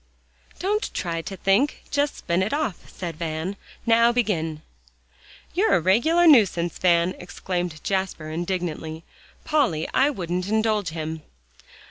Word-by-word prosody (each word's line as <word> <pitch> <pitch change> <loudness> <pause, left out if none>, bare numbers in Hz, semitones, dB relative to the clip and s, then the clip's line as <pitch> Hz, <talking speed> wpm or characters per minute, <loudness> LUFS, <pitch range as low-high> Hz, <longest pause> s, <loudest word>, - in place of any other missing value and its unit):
"Don't 415 +4 -1
try 165 -2 -2
to 195 +3 -7
think; 205 +11 +1
just 290 0 +1
spin 170 +1 0
it 195 +6 -1
off," 290 - -2
said 170 -4 -6
Van. 160 +3 -3 0.3
"Now 230 0 +5
begin." 165 -10 -1 0.9
"You're 400 +6 +3
a - - +4
regular 240 - +3
nuisance, 195 - +4
Van!" 175 0 +3
exclaimed 175 -2 -4
Jasper 190 -5 -2
indignantly. 165 -2 -3 0.4
"Polly, 250 - +1
I 275 +2 +4
wouldn't 180 - -3
indulge 215 -3 +1
him." 160 0 -5
185 Hz, 125 wpm, -24 LUFS, 170-230 Hz, 0.9 s, Now